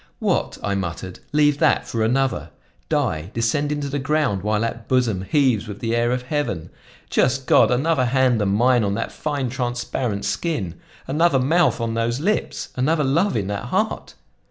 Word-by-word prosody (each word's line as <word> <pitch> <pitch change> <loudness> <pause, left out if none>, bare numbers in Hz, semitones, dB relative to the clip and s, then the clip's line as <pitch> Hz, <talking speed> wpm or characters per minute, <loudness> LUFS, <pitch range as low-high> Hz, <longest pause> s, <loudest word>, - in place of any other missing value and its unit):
"What!" - - -1
I 100 - 0
muttered, 95 -1 -4
"leave 150 -1 +3
that 160 - +3
for 115 -2 -1
another! 130 +3 0 0.4
Die, 80 +3 0
descend 145 +6 0
into 145 -1 -2
the 140 +1 -2
ground, 145 -8 0
while 105 +1 0
that 115 0 -3
bosom 120 -7 +1
heaves 115 +2 +1
with 105 -2 -6
the 115 +1 -1
air 120 0 +2
of 125 0 -1
heaven? 125 - -3 0.4
Just 130 +1 +2
God! - - +5
another 130 +2 +2
hand 125 -2 +2
than 100 - +1
mine 120 +4 +3
on 100 -1 0
that 115 - -3
fine, 145 -4 -2
transparent 120 -4 -2
skin! 120 - -2 0.3
Another 150 +2 +3
mouth 145 +2 +2
on 115 -1 -2
those 115 +2 -1
lips, 205 +8 -1
another 150 +5 +1
love 165 - +1
in 100 - -1
that 100 -1 -3
heart! - - -2
125 Hz, 175 wpm, -22 LUFS, 110-145 Hz, 0.4 s, God